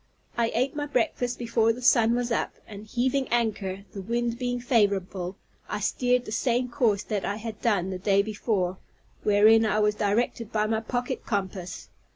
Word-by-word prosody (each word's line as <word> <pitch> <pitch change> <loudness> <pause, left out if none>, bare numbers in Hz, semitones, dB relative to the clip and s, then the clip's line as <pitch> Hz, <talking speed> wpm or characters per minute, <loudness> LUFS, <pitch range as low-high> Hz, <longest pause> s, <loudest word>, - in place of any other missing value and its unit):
I 235 -1 +1
ate 255 +5 0
my 290 0 -2
breakfast 245 -2 0
before 230 -1 +2
the 240 +2 -6
sun 235 -1 +5
was 245 0 -1
up; 230 - -1
and 210 0 -10
heaving 260 +4 0
anchor, 205 -5 -1
the 195 - -5
wind 235 +3 -2
being 245 -1 -1
favorable, 200 -6 0 0.3
I - - -2
steered 250 0 +1
the - - -7
same 245 +2 0
course 225 -5 +1
that 205 -3 -2
I 200 - -1
had 220 0 -7
done 195 -5 +1
the 185 - -4
day 200 +1 +3
before, 200 -4 -1 0.4
wherein 215 +2 +5
I 215 -1 +1
was 210 0 +3
directed 215 +2 -1
by 215 -1 +1
my 220 0 0
pocket 245 +2 -3
compass. 190 -3 -3
225 Hz, 180 wpm, -26 LUFS, 205-240 Hz, 0.4 s, sun